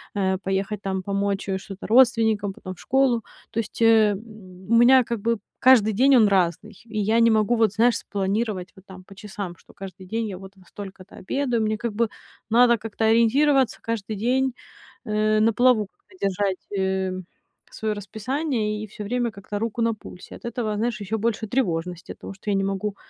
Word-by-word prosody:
э, 190 -1 +1
поехать 195 +2 -2
там 190 -1 -2
помочь, 200 0 -2
э, 190 - 0
что-то 195 0 -9
родственникам, 220 -4 +3
потом 185 -1 -8
в - - -21
школу. 260 -4 +2 0.3
То 230 - -3
есть, 225 +1 -5
э, 220 -2 +6
м, 195 - -3 0.5
у 230 - +4
меня 250 +2 +7
как 235 -1 -3
бы 230 -1 0 0.2
каждый 225 -5 +5
день- 265 +5 +5
он 220 -4 +6
разный, 195 +2 0
и 220 -1 -7
я 220 +3 +2
не 230 0 +5
могу, 220 +2 +2
вот 220 -3 +3
знаешь, 230 +1 +3
спланировать 200 -1 -2
вот 190 - -16
там 185 -1 -12
по 195 - -15
часам: 200 -3 -7
что - - -20
каждый 190 -1 -10
день 225 +2 -2
я 190 -3 -6
вот 195 0 -12
во 185 - -19
столько-то 195 -2 -11
обедаю. 245 +2 -1
Мне 215 0 0
как 230 -1 -4
бы 230 0 0 0.4
надо 235 +1 +5
как-то 220 0 -3
ориентироваться 255 +4 +3
каждый 220 -2 -3
день, 255 +5 +1 0.5
э, 215 0 +1
на 225 +1 +3
плаву, 245 -2 +4
как-то 395 - -24
держать, 195 0 -1 0.2
эм, 190 -1 -1 0.5
своё 215 -1 -2
расписание 215 +1 -3
и - - -7
всё 210 - -8
время 240 +2 -1
как-то 205 0 -6
руку 230 +1 -3
на 230 0 +2
пульсе. 185 -3 -12
От - - -13
этого, 230 -2 -2
знаешь, 225 -1 -1
ещё 215 +3 -2
больше 220 0 -1
тревожности, 180 -7 -2
оттого - - -9
что 195 +2 -7
я 200 - +2
не 195 - +1
могу 195 +1 -2
215 Hz, 195 wpm, -24 LUFS, 195-230 Hz, 0.5 s, меня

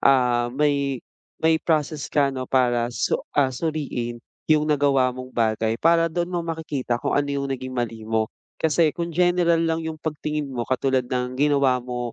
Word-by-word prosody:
ah, 125 -2 +3
may, 140 -1 0 0.4
may 160 0 +4
process 155 -2 -1
ka 140 -2 +2
'no, 130 -1 -5
para 120 -2 +2
su 115 -3 -1 0.2
ah, 135 -2 +3
suriin 130 -5 -3 0.3
yung 155 -1 +4
nagawa 140 -3 +3
mong 130 0 -8
bagay 110 -1 +1
para 165 0 +4
doon 175 +2 -2
mo 175 - 0
makikita 155 -7 -2
kung - - -1
ano 145 0 +1
yung 140 -1 -2
naging 130 0 -5
mali 115 -2 -3
mo. 110 -1 +1 0.3
Kasi 160 -1 +3
kung 170 0 -2
general 175 0 +3
lang 165 0 0
yung 160 -1 -4
pag-tingin 150 -1 -3
mo 120 -3 -3
katulad 130 +1 +1
ng 125 0 -3
ginawa 140 -2 +3
mo, 120 -1 -4
140 Hz, 175 wpm, -23 LUFS, 125-155 Hz, 0.4 s, may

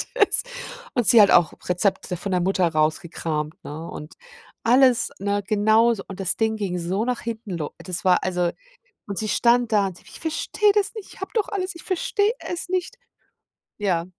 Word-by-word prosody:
das - - +4 0.5
und 245 -3 +2
sie 230 -3 +8
hat 200 - +6
auch 175 -3 +5 0.2
Rezepte 180 0 0
von 195 +3 -5
der 180 -1 +1
Mutter 185 0 +2
rausgekramt, 155 -1 -2
ne? 160 +3 -7
Und 150 +1 -9 0.5
alles, 250 +1 +4
ne, 200 +1 -1
genauso 215 +1 +3
und 195 0 -9
das 180 -2 +1
Ding 220 -1 +1
ging 195 -4 -3
so 185 +5 -1
nach 250 -1 -2
hinten 225 -2 -6
lo 150 -3 -4
das 185 0 -5
war 180 -1 +4
also 180 -2 0 0.6
und 200 -2 -5
sie 215 - -2
stand 240 +1 +3
da 205 -2 +3
und 180 -2 -8
sie: - - -19
„Ich - - -12
verstehe 370 +6 +1
das 410 -1 +1
nicht. 435 -4 -9
Ich - - -16
habe 385 - -5
doch 440 -4 +1
alles 380 -2 -3
Ich 335 - -10
verstehe 405 +3 0
es 355 0 -5
nicht.“ 370 +6 -2 0.8
Ja. 185 -5 0
205 Hz, 190 wpm, -23 LUFS, 180-250 Hz, 0.8 s, sie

